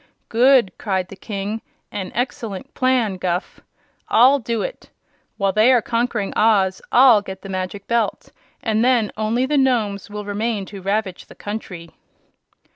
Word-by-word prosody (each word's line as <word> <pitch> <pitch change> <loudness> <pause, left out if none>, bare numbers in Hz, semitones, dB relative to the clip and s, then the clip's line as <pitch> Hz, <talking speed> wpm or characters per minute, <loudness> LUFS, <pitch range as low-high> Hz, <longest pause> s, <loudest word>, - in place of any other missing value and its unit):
"Good!" 245 -3 +4
cried 190 -3 -2
the - - -9
King. 205 +2 -5 0.3
"An 190 -2 -5
excellent 235 -1 -4
plan, 250 -7 +1
Guph. 180 0 -3 0.5
I'll 260 +5 +6
do 230 -1 -2
it. - - -7 0.5
While 195 -2 +1
they 215 +5 +4
are 250 - +5
conquering 230 -3 -1
Oz 200 -4 +3
I'll 245 -4 +7
get 190 -1 -9
the 195 - -8
Magic 185 +1 -4
Belt, 235 -2 -1 0.3
and 220 -1 +1
then 240 -4 +2
only 220 +4 0
the 290 +1 +1
Nomes 220 -8 0
will 210 0 -6
remain 205 0 -2
to 195 0 -10
ravage 195 -1 -2
the - - -14
country." 185 -6 -7
215 Hz, 150 wpm, -21 LUFS, 195-240 Hz, 0.5 s, I'll